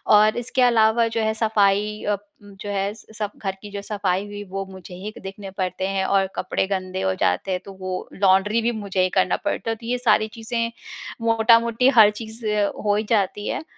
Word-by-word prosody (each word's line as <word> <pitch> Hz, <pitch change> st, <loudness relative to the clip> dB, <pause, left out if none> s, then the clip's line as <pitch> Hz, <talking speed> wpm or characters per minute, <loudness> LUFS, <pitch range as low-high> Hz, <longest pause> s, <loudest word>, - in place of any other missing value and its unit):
और 215 Hz, +1 st, +5 dB
इसके 255 Hz, +2 st, -1 dB
अलावा 230 Hz, -1 st, +4 dB
जो 225 Hz, -, 0 dB
है, 220 Hz, 0 st, +1 dB
सफाई 210 Hz, -1 st, +1 dB
अ, 205 Hz, -1 st, 0 dB, 0.3 s
जो 205 Hz, 0 st, -9 dB
है, 200 Hz, 0 st, -1 dB
सब 215 Hz, -1 st, -6 dB
घर 195 Hz, -2 st, -3 dB
की 210 Hz, -, -9 dB
जो 200 Hz, 0 st, -5 dB
सफाई 200 Hz, -2 st, -1 dB
हुई, 205 Hz, 0 st, -7 dB
वो 195 Hz, 0 st, -4 dB
मुझे 185 Hz, -1 st, -10 dB
ही 205 Hz, +4 st, -8 dB
देखने 195 Hz, 0 st, -8 dB
पड़ते 185 Hz, 0 st, -2 dB
हैं। 195 Hz, -1 st, -1 dB
और 195 Hz, -1 st, +2 dB
कपड़े 190 Hz, -, -1 dB
गंदे 185 Hz, -1 st, -3 dB
हो 95 Hz, -, +1 dB
जाते 90 Hz, -, +1 dB
हैं, 180 Hz, -, 0 dB
तो 195 Hz, -, -9 dB
वो 185 Hz, -1 st, -4 dB
लॉन्ड्री 195 Hz, +3 st, +3 dB
भी 235 Hz, +1 st, +1 dB
मुझे 200 Hz, -4 st, -2 dB
ही 185 Hz, -, +2 dB
करना 185 Hz, -1 st, +3 dB
पड़ता -, -, -1 dB
है। 225 Hz, -, 0 dB
तो 230 Hz, +1 st, -13 dB
ये 245 Hz, +2 st, 0 dB
सारी 220 Hz, -3 st, +3 dB
चीज़ें, 230 Hz, +1 st, -2 dB, 0.5 s
मोटा-मोटी, 230 Hz, +2 st, +4 dB
हर 220 Hz, -5 st, +7 dB
चीज़ 220 Hz, +1 st, -8 dB, 0.4 s
हो 205 Hz, 0 st, +3 dB
ही 215 Hz, -, 0 dB
जाती 205 Hz, -1 st, 0 dB
है। -, -, -2 dB
205 Hz, 205 wpm, -23 LUFS, 195-225 Hz, 0.5 s, हर